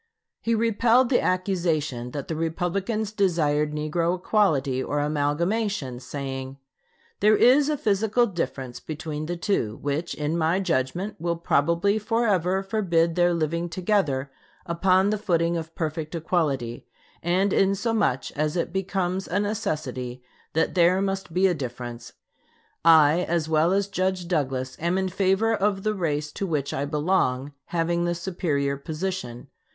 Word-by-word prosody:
He 230 0 +1
repelled 230 +2 +3
the 245 - +3
accusation 165 -9 -1
that 140 +1 -6
the 160 - -3
Republicans 190 +7 -2
desired 155 -7 +1
negro 165 +4 0
equality 155 -10 +1
or 145 - -1
amalgamation, 150 - -1
saying: 135 0 -6 0.6
"There 210 +1 +5
is 275 +4 +5
a 300 - 0
physical 220 +2 +2
difference 135 - -4
between 155 0 -5
the 175 +1 -3
two, 165 - -1
which, 145 +4 -2
in 155 +3 -1
my 165 +3 +2
judgment, 180 +4 -1
will 170 +1 -1
probably 170 +6 +1
forever 200 -5 +1
forbid 175 -5 +1
their 175 0 +3
living 170 +1 -1
together 165 -7 0 0.3
upon 185 +3 +2
the 215 - -1
footing 170 -4 +1
of 165 -1 -5
perfect 160 0 -3
equality; 145 -8 -1 0.3
and 185 +4 +1
inasmuch 195 - +1
as 150 +3 -1
it 170 0 -2
becomes 190 -1 -1
a 185 - 0
necessity 145 - -3 0.3
that 160 +1 +1
there 180 +1 +4
must 195 -2 -2
be 185 +3 +2
a 185 - +4
difference, 120 -4 -6 0.7
I, 160 -1 +6
as 165 -2 0
well 160 +2 +3
as 200 +1 +2
Judge 185 -2 -1
Douglas, 130 -6 -1
am 170 +3 0
in 190 0 0
favor 195 +4 +2
of 200 -2 0
the 215 - +1
race 150 -6 -2
to 195 - -3
which 145 -5 -1
I 140 - -1
belong 145 -3 0
having 170 0 0
the 175 0 0
superior 150 -6 -1
position. 155 -5 -5
170 Hz, 145 wpm, -25 LUFS, 150-195 Hz, 0.7 s, I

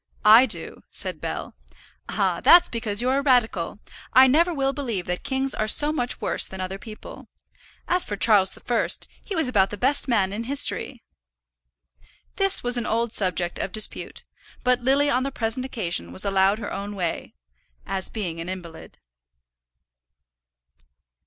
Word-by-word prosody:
"I 225 +5 +7
do," - - -6
said - - -5
Bell. - - -5 0.6
"Ah, - - -1
that's 350 0 +7
because 230 -2 -1
you're 260 +2 +1
a - - -2
radical. 235 - 0 0.4
I 260 +1 +7
never 325 +7 +3
will 275 -4 -1
believe 235 -11 -4
that 180 0 -4
kings 265 0 +1
are 215 - -2
so 295 +7 +6
much 250 -4 -2
worse - - +1
than 190 - -10
other 185 +1 -5
people. 215 -1 -12 0.6
As 360 0 +1
for 205 - -5
Charles 200 -3 +4
the - - -14
First, 240 -2 0 0.2
he 400 - -6
was 320 -5 +3
about 200 -6 +2
the 210 - -7
best 275 +7 0
man 200 -6 0
in 225 +3 -5
history." 270 -2 -1 1.3
This 390 -1 +5
was 245 0 +3
an 240 - -3
old 230 +1 -1
subject 180 -3 -1
of 190 - -3
dispute; 215 +2 -2 0.4
but 250 0 +2
Lily 275 +3 +2
on 250 - +1
the 275 +1 -3
present 240 +1 -3
occasion 170 - -3
was 90 - 0
allowed 195 +1 +2
her 215 - -6
own 205 +1 -6
way, 175 -4 -4 0.5
as 190 -1 -4
being 180 -7 -5
an 165 +2 -6
invalid. 175 -3 -9
230 Hz, 165 wpm, -23 LUFS, 195-265 Hz, 1.3 s, I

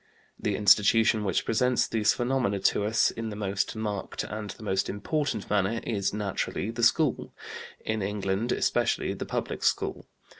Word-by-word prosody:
The 105 - -1
institution 105 +2 +4
which 95 -4 0
presents 125 +2 +2
these 110 -2 +2
phenomena 120 -5 0
to 100 +2 +2
us 110 +1 +3
in 115 -1 -5
the 105 - -6
most 100 +1 -2
marked 105 -3 -3
and 105 0 -6
the 110 - -9
most 95 -2 0
important 120 +2 -2
manner 105 +2 +1
is, 100 -4 -1
naturally, 105 0 -2
the 120 +1 -5
school, 150 +7 +2 0.5
in 110 -1 -1
England 100 +3 -1
especially - - +1
the - - -6
Public - - -3
School. - - 0
105 Hz, 155 wpm, -27 LUFS, 100-115 Hz, 0.5 s, institution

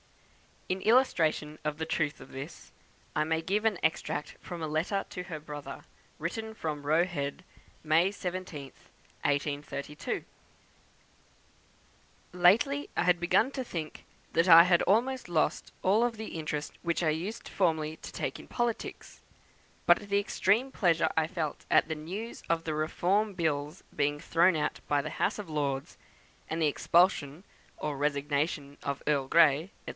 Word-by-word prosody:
In 185 +1 -2
illustration 165 - +2
of 150 -1 -1
the 160 - -2
truth 155 -2 -1
of - - -12
this, 135 +4 -9 0.4
I 150 - +3
may 160 +1 0
give 200 +6 -1
an 215 -4 +2
extract 160 -2 -1
from 175 -3 -7
a - - -1
letter 165 +6 -1
to 180 - -5
her 170 -4 -6
brother, 145 -2 -8 0.3
written 220 +7 -4
from 150 -6 -4
Roe 160 +3 +4
Head, 160 -2 -4 0.4
May 160 +4 +4
17th, 180 -8 -6 0.4
1832: 145 0 -2 2.1
"Lately 220 +12 +3
I - - +3
had 180 -1 +3
begun 180 +9 +3
to 265 -2 -3
think 160 -8 -6 0.3
that 165 +2 +2
I 165 -1 +11
had 175 -1 +4 0.5
lost 165 -2 0
all 220 +6 +4
the 220 -7 -7
interest 155 -1 -3
which 170 0 -1
I 160 - +3
used 175 +9 -3
formerly 160 -4 0
to - - -9
take - - -4
in - - -12
politics; 240 -2 -3 0.6
but - - +6
the 200 0 +3
extreme 210 +5 +1
pleasure 165 -7 +2
I 160 -1 +3
felt 165 -4 -4
at - - +4
the 160 - -1
news 190 +10 -6
of 165 0 +1
the 160 - -2
Reform 185 +7 +1
Bill's 155 -2 -2
being 145 0 +1
thrown 170 +2 +3
out 150 - -1
by 145 -1 +2
the 155 - -5
House - - 0
of 210 -5 -7
Lords, 140 -3 -2 0.5
and 160 - -2
of - - -1
the 155 - +4
expulsion, 165 -1 +2 0.3
or 150 -2 -3
resignation 145 0 -1
of 140 -1 -4
Earl 140 -3 +1
Grey, 160 +2 +5 0.2
&c. - - -5
160 Hz, 155 wpm, -30 LUFS, 150-185 Hz, 2.1 s, I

